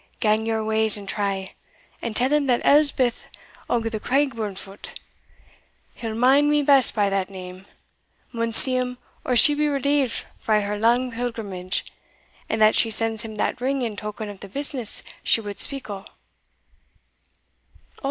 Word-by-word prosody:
"Gang 215 +1 +1
your 220 -1 -1
ways 220 -1 +3
and 200 -1 -10
try; 195 -2 -3 0.5
and 235 -2 -5
tell 255 +4 +2
him 295 -2 +1
that 245 -2 +1
Elspeth 280 -4 +3 0.4
o' 240 - +1
the 225 -1 -4
Craigburnfoot 220 -8 -3 0.9
he'll 225 -2 -6
mind 270 +5 +4
me 295 0 +2
best 275 -2 +5
by 205 -2 +2
that 195 -1 -1
name 185 0 -10 0.6
maun 230 -1 -2
see 255 +3 +7
him 250 0 -3 0.3
or 250 - -1
she 295 +5 +7
be 300 +1 0
relieved 280 -2 0
frae 215 -2 +1
her 205 0 -4
lang 240 +3 +2
pilgrimage, 220 -6 -4 0.6
and 220 - -1
that 215 0 +5
she 225 - +3
sends 225 0 0
him 220 -1 -8
that 230 +3 -2
ring 270 +1 -1
in 225 -3 -4
token 210 +1 -6
of 205 -2 -9
the 200 - -11
business 265 -1 0 0.2
she - - +2
wad 205 -2 -8
speak 275 -1 0
o'." 200 -2 -7
225 Hz, 155 wpm, -23 LUFS, 210-255 Hz, 0.9 s, see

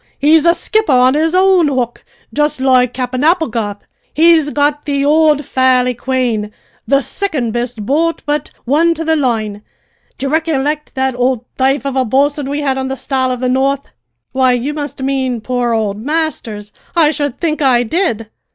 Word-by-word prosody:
He's 310 +3 +4
a 340 - +5
skipper 435 -3 0
on 255 +1 +4
his 320 +3 +1
own 370 -3 +4
hook, 250 -4 -2 0.3
jist 295 -2 0
loike 255 -2 +3
Cap'en 255 +1 -3
Applegarth. 235 - 0 0.3
He's 320 -1 +4
got 290 0 0
the 280 -1 0
ould 300 -1 +3
Fairi 255 -1 +2
Quane, 240 -4 -1 0.4
the 275 0 +3
sicond 295 - -2
best 240 -3 -4
boat 325 +7 0
but 295 0 -2 0.2
one 325 +6 +2
to 325 +1 -4
the 320 0 +2
line. 220 -7 -1 0.6
D'ye 275 - -2
ricollict 300 -1 -1
that 265 0 0
ould 250 -1 0 0.2
thaife 270 +2 +1
of 275 -1 -2
a 260 - +2
bo'sun 275 +3 0
we 290 +1 -2
had 270 -2 -1
on 265 - -2
the 270 0 -4
Star 260 0 -1
of 250 -1 -4
the 255 - 0
North?" 270 +2 0 0.4
"Why, 260 -1 +2
you 250 +4 -2
must 290 -2 -5
mean 260 -3 -1
poor 245 +1 -1
old 215 -2 -1
Masters! 260 -9 -3 0.2
I 315 -3 +4
should 290 -4 -3
think 310 -3 -1
I 250 -3 +3
did." 235 - -1
270 Hz, 175 wpm, -15 LUFS, 250-300 Hz, 0.6 s, a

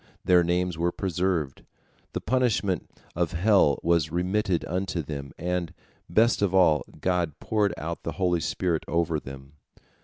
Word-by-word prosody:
Their 90 -1 +5
names 90 -1 0
were 85 +1 +1
preserved, 90 -6 -2 0.5
the - - -3
punishment 110 -7 0 0.3
of 85 0 -1
hell 90 -5 +4
was 85 -2 +2
remitted 90 +1 0
unto 90 -1 -2
them, 70 -2 -6
and, 90 -1 -2 0.4
best 110 +7 +3
of 95 -2 +1
all, 80 -5 +4 0.2
God 90 -5 -1
poured 105 -3 0
out - - -5
the - - -4
holy 90 -3 +1
spirit 85 0 -1
over 85 -2 0
them. 70 0 -11
90 Hz, 145 wpm, -26 LUFS, 80-95 Hz, 0.5 s, Their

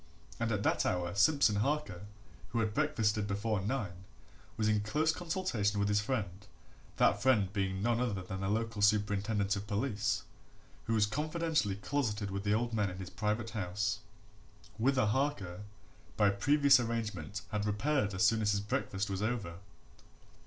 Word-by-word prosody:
And 115 0 0
at 105 -2 -1
that 85 -2 +2
hour 90 -1 -1
Simpson 110 0 +4
Harker, 105 -6 -1 0.4
who 115 - -1
had 110 -2 0
breakfasted 110 -8 +1
before 100 +1 -1
nine, 100 -5 -3 0.5
was 110 - +1
in 105 -1 +3
close 150 +10 +1
consultation 160 - -1
with 100 0 +1
his 105 0 +3
friend 105 -5 -3 0.5
that - - +3
friend 105 -8 +3
being 95 -1 -1
none 120 +1 +2
other 105 -7 -1
than 95 +1 -6
the 95 - -1
local 110 0 -1
superintendent 105 0 +2
of 100 0 -5
police, 105 0 -1 0.6
who 115 - 0
was 105 -1 +4
confidentially 155 - 0
closeted 105 -2 -2
with 100 0 -3
the 105 0 +1
old 120 +1 -1
man 105 -3 +1
in 90 - -7
his 95 -1 -7
private 110 +2 -2
house, 100 0 -2 0.8
whither 130 0 +3
Harker, 105 -6 -1 0.6
by 105 -2 +4
previous 140 +6 +5
arrangement, 110 -6 -3
had 105 0 -1
repaired 105 -1 0
as 95 - +1
soon 115 -1 +3
as 105 -1 +2
his 100 - +1
breakfast 100 -1 -2
was 95 -1 -3
over. 105 -7 -2
105 Hz, 160 wpm, -32 LUFS, 100-120 Hz, 0.8 s, previous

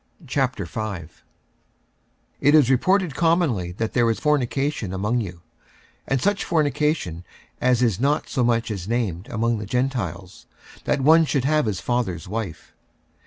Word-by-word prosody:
46:005:001 110 - -3 1.3
It 145 +2 +5
is 140 -4 +5
reported 180 +5 +2
commonly 160 - +1
that 110 +4 -3
there 120 -2 +3
is 110 -3 -1
fornication 140 -6 0
among 105 +6 0
you, 90 -5 -7 0.7
and 135 - +1
such 205 +8 +1
fornication 150 - 0 0.4
as 125 -1 +3
is 110 -5 +1
not 140 +4 +1
so 130 - 0
much 115 -1 +1
as 95 -3 -5
named 105 -6 -2
among 115 0 0
the 105 - -6
Gentiles, 105 -7 -3 0.4
that - - +1
one 160 +4 +6
should 135 -2 0
have 150 -3 +2
his 95 -3 -2
father's 110 -10 -2
wife. 100 -5 -5
120 Hz, 140 wpm, -23 LUFS, 100-140 Hz, 1.3 s, one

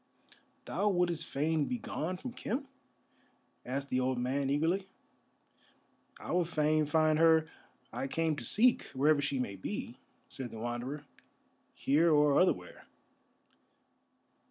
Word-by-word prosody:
"Thou 210 +1 0
wouldest 175 -3 0
fain 155 +2 0
begone 185 -8 -3
from 245 +6 -7
Khem?" 260 +2 -3 1.0
asked 135 +2 -4
the 130 - +2
old 130 0 0
man, 135 +3 -1
eagerly. 165 +7 +1 1.3
"I - - -6
would 175 -2 +1
fain 155 -1 +2
find 155 0 +3
her 160 -1 +5 0.5
I 135 - -3
came 160 +2 0
to - - -6
seek, 240 +3 +3
wherever 145 +2 +3
she 140 -1 -1
may 125 -6 -3
be," 95 - -5 0.3
said 130 -2 -6
the 115 - -9
Wanderer. 120 +6 -4 0.7
"Here 160 +5 +3
or 150 -2 +4
otherwhere." 90 - 0
155 Hz, 125 wpm, -32 LUFS, 135-170 Hz, 1.3 s, her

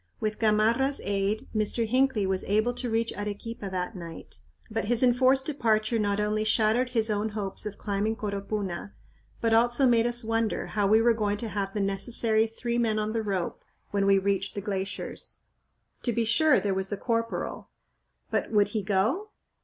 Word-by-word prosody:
With 215 0 -2
Gamarra's 225 +5 +2
aid, 200 +1 -1
Mr. 215 +2 +1
Hinckley 255 -2 +2
was 190 0 -1
able 215 +4 +1
to 245 0 -3
reach 225 +1 0
Arequipa 205 +1 -5
that 185 +3 -3
night, 170 -2 -9 0.3
but 220 - -1
his 240 +3 +2
enforced 260 +2 +4
departure 225 -5 +1
not 205 -1 0
only 210 +1 0
shattered 220 +3 +2
his 225 -3 +1
own 210 +1 0
hopes 210 -1 -2
of 210 - -7
climbing 205 +2 -1
Coropuna, 200 -2 -4 0.5
but 230 -1 +2
also 240 +4 +4
made 235 -2 +4
us 240 0 +1
wonder 225 0 -1
how 205 -2 0
we 220 +2 +5
were 235 0 +5
going 205 -2 -1
to 225 +1 -4
have 195 0 -3
the 205 - 0
necessary 220 +3 +1
three 235 +1 -3
men 220 -2 +1
on 215 0 -1
the 225 - 0
rope 195 -5 -3 0.3
when 200 -1 +1
we 195 0 +5
reached 195 0 -1
the - - -2
glaciers. 195 -1 -5 0.6
To 240 - -1
be 230 0 0
sure, 305 +7 +4
there 200 -2 -1
was 190 0 -2
the 205 - -3
corporal 230 +1 -2 0.6
but - - 0
would 205 -2 +3
he 220 - -2
go? 215 - 0
215 Hz, 180 wpm, -27 LUFS, 200-230 Hz, 0.6 s, we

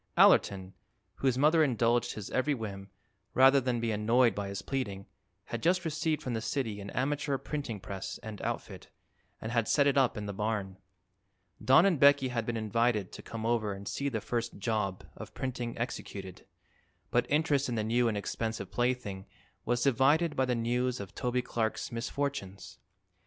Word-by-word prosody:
Allerton, 95 -1 +4 0.4
whose 130 -2 +1
mother 155 +4 +5
indulged 120 -3 +1
his 105 -3 -7
every 145 +3 +1
whim, 100 -4 -6 0.5
rather 135 +1 +6
than 125 -1 0
be 115 -1 -1
annoyed 115 +2 +3
by 100 0 -3
his 100 0 -5
pleading, 100 -8 -3 0.4
had 120 - -5
just 180 +1 +2
received 155 0 -1
from 125 - -3
the 110 - -2
city 110 -7 -2
an 100 - -7
amateur 140 +1 -1
printing 140 -7 -4
press 95 0 -6
and 110 -2 -7
outfit - - -5 0.5
and 110 - -5
had 115 -2 +1
set 145 - +3
it 140 -1 +4
up 125 -4 +2
in 105 - -4
the 100 - -4
barn. 100 -2 -2 0.8
Don 135 +7 +6
and 180 -7 +2
Becky 140 -1 +6
had 115 -2 -2
been 120 -1 -1
invited 110 -2 0
to - - -9
come 115 -1 -6
over 115 -3 +1
and 100 0 -9
see 140 0 -2
the 110 -5 -3
first 120 +1 -3
"job" 100 -3 -2
of - - -10
printing 125 -2 -4
executed, 100 -6 -6 0.6
but 120 0 +1
interest 145 -2 +2
in 120 - -1
the 110 - 0
new 120 +2 +2
and 110 -2 0
expensive 110 -1 -3
plaything 120 -6 -1 0.4
was 120 +1 +1
divided 145 +5 +3
by 130 - +2
the 125 -1 0
news 125 +2 0
of 100 0 -8
Toby 125 0 -1
Clark's 110 -3 -2
misfortunes. 115 -6 -4
120 Hz, 175 wpm, -30 LUFS, 105-135 Hz, 0.8 s, rather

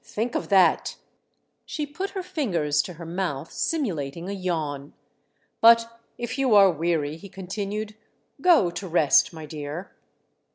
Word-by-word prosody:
Think 235 +3 -3
of - - -3
that 185 -5 +3 0.4
!" - - -47 0.3
She 300 - -3
put 355 +7 -5
her 375 - -2
fingers 180 - 0
to 180 - -8
her 170 +1 -10
mouth 165 -4 -3
simulating 170 - -2
a - - -3
yawn. 155 -7 -3 0.7
"But 230 0 +5 0.2
if 240 +3 -4
you 260 -5 +3
are 195 -2 +7
weary," 160 -2 -1
he 200 +4 -12
continued, 205 +3 -5 0.5
"go 320 - +5
to 190 +2 -6
rest, 160 -4 +4
my 160 -2 -9
dear." 150 +4 -7
185 Hz, 150 wpm, -25 LUFS, 160-230 Hz, 0.7 s, are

